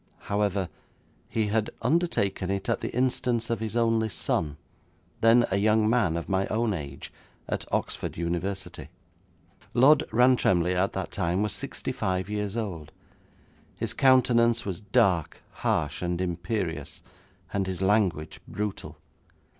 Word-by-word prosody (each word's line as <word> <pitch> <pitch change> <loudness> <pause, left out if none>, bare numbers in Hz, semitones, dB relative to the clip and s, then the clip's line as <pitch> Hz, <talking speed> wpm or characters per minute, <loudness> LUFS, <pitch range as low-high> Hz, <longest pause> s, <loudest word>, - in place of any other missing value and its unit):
However, 100 -2 0 0.6
he 110 -2 0
had 110 0 +1
undertaken 100 - +1
it 100 0 -2
at - - 0
the - - -3
instance 125 -2 0
of 115 - 0
his 110 0 -4
only 115 -1 +2
son, 75 -4 -1 0.6
then 115 +1 +5
a 95 - +2
young 110 +1 +3
man 110 -8 +2
of 85 - -5
my 95 0 +1
own 110 0 0
age, 70 -6 -7 0.3
at - - -4
Oxford - - -2
University. 85 -2 -3 0.9
'Lord 135 +4 +6
Rantremly 110 -7 +4
at 95 +2 +1
that 95 - -4
time 90 +1 0
was 105 - 0
sixty - - -3
five 95 +2 -2
years 105 0 -2
old. 90 -9 -4 0.9
His - - -2
countenance 120 -3 +4
was 95 -1 -4
dark, 95 -5 +1
harsh, 75 -2 -1
and 90 -1 -1
imperious, 90 0 -3 0.5
and 95 -1 0
his 95 -2 -3
language 95 -5 +1
brutal. 105 -1 -5
100 Hz, 135 wpm, -27 LUFS, 90-115 Hz, 0.9 s, Lord